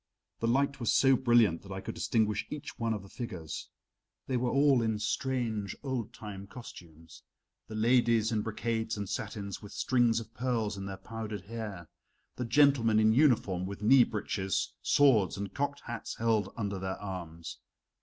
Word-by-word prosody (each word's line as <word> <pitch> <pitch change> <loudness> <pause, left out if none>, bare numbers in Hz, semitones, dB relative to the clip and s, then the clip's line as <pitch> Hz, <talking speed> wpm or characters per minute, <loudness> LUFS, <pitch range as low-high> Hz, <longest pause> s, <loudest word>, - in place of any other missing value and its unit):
The 115 - 0
light 140 +3 +1
was 120 - +1
so 135 -1 +5
brilliant 120 -9 +4
that 100 - -12
I 95 - -4
could - - -6
distinguish 105 -3 0
each 150 -1 -7
one 115 -1 0
of 105 -3 -2
the - - -12
figures. 90 - -6 0.6
They 130 - -2
were 125 0 +1
all 140 -2 +4
in 110 -2 0
strange 110 -2 -2
old 130 -5 -3
time 100 -2 -8
costumes; 85 -9 -12 0.5
the 110 - -7
ladies 115 0 +3
in 110 -2 +1
brocades 110 0 -2
and 100 -1 -3
satins 100 0 -4
with 105 - -10
strings 120 -3 +2
of 115 0 -10
pearls 120 -4 -1
in 100 0 -6
their 95 -1 -6
powdered 110 0 -6
hair, 100 -4 -7 0.5
the 125 - -3
gentlemen 120 -3 +4
in 110 0 +5
uniform 110 - +3
with 100 +1 -7
knee 125 +3 +7
breeches, 100 -3 -2
swords, 120 -11 +4
and 100 -1 -5
cocked 145 0 -2
hats 120 -2 -6
held 110 -4 +1
under 100 -3 -2
their 95 0 -4
arms. 85 -5 -7
110 Hz, 170 wpm, -31 LUFS, 100-120 Hz, 0.6 s, knee